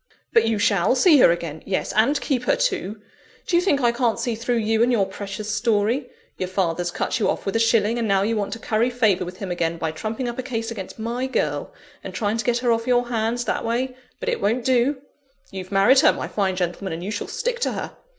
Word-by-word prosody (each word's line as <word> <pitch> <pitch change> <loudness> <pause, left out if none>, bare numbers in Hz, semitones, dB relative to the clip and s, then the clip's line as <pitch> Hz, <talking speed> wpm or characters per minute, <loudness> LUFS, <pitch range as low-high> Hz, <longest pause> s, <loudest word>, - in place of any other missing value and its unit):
"But 230 -1 +4
you 225 -1 +1
shall 205 0 +2
see 300 +2 +6
her - - +7
again 170 -2 -2
yes! 190 - -2
and 230 +8 +3
keep 250 -4 -1
her - - +3
too! 225 - -1 0.5
Do 350 - 0
you 345 - +5
think 325 -7 +1
I 240 -1 +4
can't 235 -1 0
see 240 - -1
through 235 +2 -1
you 220 0 +1
and 240 +1 +4
your 215 -5 +3
precious 200 +2 -5
story? 225 +3 +1 0.3
Your 185 - -2
father's 175 -2 -1
cut 175 - -2
you 215 - +1
off - - -2
with 195 - -2
a - - +3
shilling; 225 0 +2
and 230 - -1
now 195 -1 +3
you 225 +2 0
want 205 -2 -2
to - - -5
curry 225 +2 0
favour 220 -7 +2
with 180 +1 -8
him 195 -2 -5
again 170 -1 -1
by 160 -1 -2
trumping 220 +9 -4
up 240 +1 -5
a - - +1
case 230 -3 -4
against 195 -5 -7
my 235 +3 -2
girl, 260 - -2 0.3
and - - -7
trying 215 0 0
to 230 - -3
get 240 -1 +2
her 240 - +4
off 230 +1 0
your 245 -1 +2
hands 235 +1 -1
that - - -1
way. 250 +3 -1 0.2
But - - -2
it - - -2
won't 230 +4 0
do! 260 +2 +2 0.5
You've 190 -1 -7
married 200 +7 +5
her, - - +6
my - - -4
fine 195 -3 -1
gentleman, 180 +1 -3
and 165 +2 -5
you 200 - -4
shall 205 - -4
stick 485 0 -2
to - - 0
her! - - -5
225 Hz, 245 wpm, -23 LUFS, 195-245 Hz, 0.5 s, her